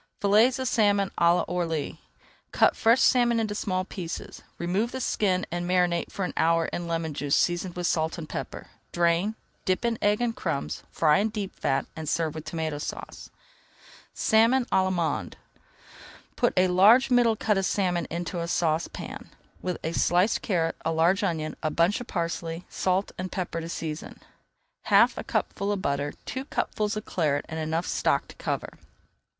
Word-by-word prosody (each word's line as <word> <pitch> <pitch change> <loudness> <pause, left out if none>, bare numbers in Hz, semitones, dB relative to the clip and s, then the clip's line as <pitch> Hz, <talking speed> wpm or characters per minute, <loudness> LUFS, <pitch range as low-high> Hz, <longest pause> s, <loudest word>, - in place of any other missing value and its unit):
FILLETS 220 +6 +4
OF 260 0 -2
SALMON 205 -4 +2
À 170 +1 +4
L'ORLY 165 -4 -2 0.5
Cut - - +4
fresh 230 +3 +4
salmon 240 -2 +4
into 215 -2 -1
small 185 -3 -1
pieces, 180 -4 -7 0.2
remove 190 +7 -1
the 260 - -4
skin, 190 -6 0
and 175 0 -2
marinate 180 -2 +1
for 195 - -2
an - - -5
hour 165 0 +3
in 175 -1 -3
lemon 165 -2 -2
juice 140 0 0
seasoned 175 0 0
with 175 0 -3
salt 160 0 0
and 160 -2 -6
pepper. - - -6 0.2
Drain, 175 +5 +1 0.3
dip 185 +5 0
in 230 -1 0
egg 205 0 +2
and 240 -1 -1
crumbs, 165 -6 -3
fry 155 +2 +3
in 215 +2 +1
deep 205 -3 -5
fat, 135 0 0
and 160 -2 -4
serve 160 -2 0
with 155 -1 -7
Tomato 160 -3 -3
Sauce. - - -7 0.9
SALMON 230 +4 +3
À - - -29
L'ALLEMANDE 185 -3 0 1.0
Put - - +2
a 185 0 +5
large 210 +9 +5
middle 240 -2 +4
cut 210 -2 +1
of 195 - 0
salmon 180 -4 0
into 175 +2 -4
a 170 - -3
saucepan, 165 -1 -2 0.3
with 180 -1 -2
a 160 - -1
sliced 180 +5 +2
carrot, 165 -5 0
a 165 - 0
large 165 +4 +3
onion, 160 -5 -1
a 155 - 0
bunch 170 +8 +2
of 245 - -8
parsley, 170 -1 -3
salt 190 +1 0
and 185 0 -4
pepper 175 -3 -3
to 165 - -6
season, 160 -2 -5 0.7
half - - +5
a - - -5
cupful 200 +1 -1
of 200 -2 -2
butter, 140 +1 -1
two 260 +1 -4
cupfuls 215 -6 -2
of 215 - -5
Claret, 150 -5 0
and 160 0 -5
enough 160 +2 -1
stock - - 0
to - - -12
cover. - - -3
180 Hz, 175 wpm, -26 LUFS, 165-205 Hz, 1.0 s, a